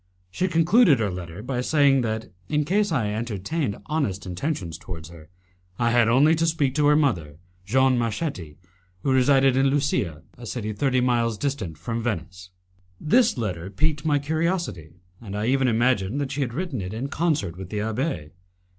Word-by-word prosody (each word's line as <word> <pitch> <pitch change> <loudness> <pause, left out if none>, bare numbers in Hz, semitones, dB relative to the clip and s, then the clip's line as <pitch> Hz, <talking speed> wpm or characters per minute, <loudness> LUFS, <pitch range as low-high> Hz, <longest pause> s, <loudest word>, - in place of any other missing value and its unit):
She 185 - 0
concluded 170 - +4
her 105 -3 -1
letter 90 +2 -7
by 125 0 -2
saying 140 -1 +3
that, 110 -1 -3 0.2
in 150 -1 +1
case 200 +4 +1
I 115 -9 0
entertained 110 - -2
honest 115 -11 -2
intentions 90 - -4
towards 80 -3 -8
her, 80 -2 -14 0.5
I 115 0 +1
had 120 -1 +4
only 135 +7 +5
to 165 +1 +1
speak 150 -5 +1
to 150 0 +2
her 150 - +5
mother, 90 - 0 0.3
Jeanne 130 +3 +3
Marchetti, 110 - -3 0.5
who 135 - +1
resided 135 0 +4
in 135 +1 +3
Lusia, 135 - -1 0.2
a 120 - -8
city 110 -2 -4
thirty 130 +4 +1
miles 120 -3 +1
distant 110 - -3
from 115 +9 -3
Venice. 90 -4 -4 0.5
This 225 - +3
letter 95 -6 -3
piqued 150 +8 -1
my 150 -2 +2
curiosity, 155 - -2 0.3
and 100 -3 -6
I 105 - -1
even 130 +1 +2
imagined 120 -1 +1
that 140 -2 -2
she 140 +1 -2
had 120 -3 -2
written 160 - -3
it 95 +3 -5
in 125 +5 -3
concert 140 - -1
with 95 0 -8
the 105 - -4
abbé. 110 - -2
125 Hz, 175 wpm, -24 LUFS, 100-145 Hz, 0.5 s, only